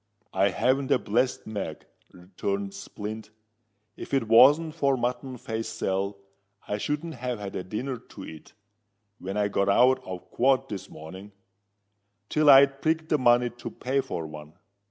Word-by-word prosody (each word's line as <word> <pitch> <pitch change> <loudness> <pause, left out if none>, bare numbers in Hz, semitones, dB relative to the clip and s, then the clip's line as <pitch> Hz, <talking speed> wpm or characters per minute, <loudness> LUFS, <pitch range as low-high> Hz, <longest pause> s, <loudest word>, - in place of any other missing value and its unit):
"I 95 +1 +3
haven't 130 +7 +1
a - - +5
blessed 125 +3 0
mag," 105 -2 -5 0.3
returned 100 +2 -4
Splint. 105 +2 -7 0.7
"If - - -4
it 130 -5 0
wasn't 145 +8 +6
for 140 -2 +1
Mutton 125 +1 -3
Face 110 -1 -4
Sal, 100 +1 -2 0.5
I 105 - -2
shouldn't 150 +7 -3
have 125 -2 -4
had 100 -2 -7
a 90 - -3
dinner 125 +7 -4
to - - -12
eat, 80 -1 -12 0.7
when 95 +2 -5
I 105 -1 +2
got 100 -1 0
out 130 +5 +4
of 90 -1 -8
quod 135 +1 +2
this 95 -3 -6
morning, 95 +6 -11 1.0
till 155 -1 +3
I'd 135 0 +7
prigged 160 0 0
the 150 - +2
money 120 -1 +4
to 120 - -8
pay 135 +2 -1
for 105 -11 -5
one. 75 0 -10
115 Hz, 155 wpm, -27 LUFS, 100-135 Hz, 1.0 s, I'd